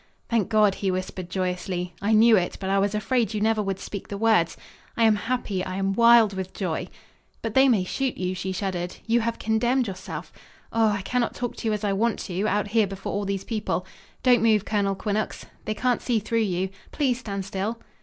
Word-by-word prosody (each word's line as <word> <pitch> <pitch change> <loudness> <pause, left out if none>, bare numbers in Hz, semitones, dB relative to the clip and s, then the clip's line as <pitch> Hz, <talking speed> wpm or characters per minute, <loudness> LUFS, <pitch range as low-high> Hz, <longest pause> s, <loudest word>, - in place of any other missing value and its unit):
"Thank 225 -4 +1
God!" 215 -3 +4
he 195 0 -2
whispered 185 -1 -3
joyously. 180 -1 -2
"I 205 +2 +1
knew 225 +1 +7
it, 180 -3 0
but 190 -1 -2
I 195 - +3
was 200 +1 +1
afraid 225 0 0
you - - 0
never 220 0 +2
would 195 -2 -2
speak 200 -1 -6
the 200 - -5
words. 215 -6 +3 0.4
I 230 - +3
am 220 -1 +6
happy 210 -4 -2
I 185 0 -4
am 195 0 0
wild 235 -1 +6
with 190 -1 -5
joy." 180 -5 -2 0.6
"But 225 -2 -2
they 265 +2 +6
may 215 -7 +3
shoot 265 +7 -2
you," 185 0 -1
she 190 +1 -3
shuddered. 185 -2 -3
"You 235 +1 +3
have 230 +1 -1
condemned 240 +4 +1
yourself. 190 -1 -7 0.4
Oh, 225 -1 +4
I 205 -2 0
cannot 250 +3 -1
talk 245 -1 -3
to - - -3
you 215 - +2
as 210 - -3
I 200 -1 +1
want 225 +3 +1
to 190 +3 -2
out 205 +1 0
here 220 -1 +3
before 195 0 -5
all 205 0 -1
these 195 -1 -2
people. 210 -5 -2 0.4
Don't 250 -1 +5
move, 220 -2 +3
Colonel 200 -2 0
Quinnox 210 +2 -2 0.2
they 215 - -2
can't 250 +2 +1
see 240 -3 +1
through 225 +2 0
you. 190 -3 0 0.2
Please 260 -5 0
stand 200 -6 -4
still." 200 +4 -3
210 Hz, 215 wpm, -25 LUFS, 190-225 Hz, 0.6 s, knew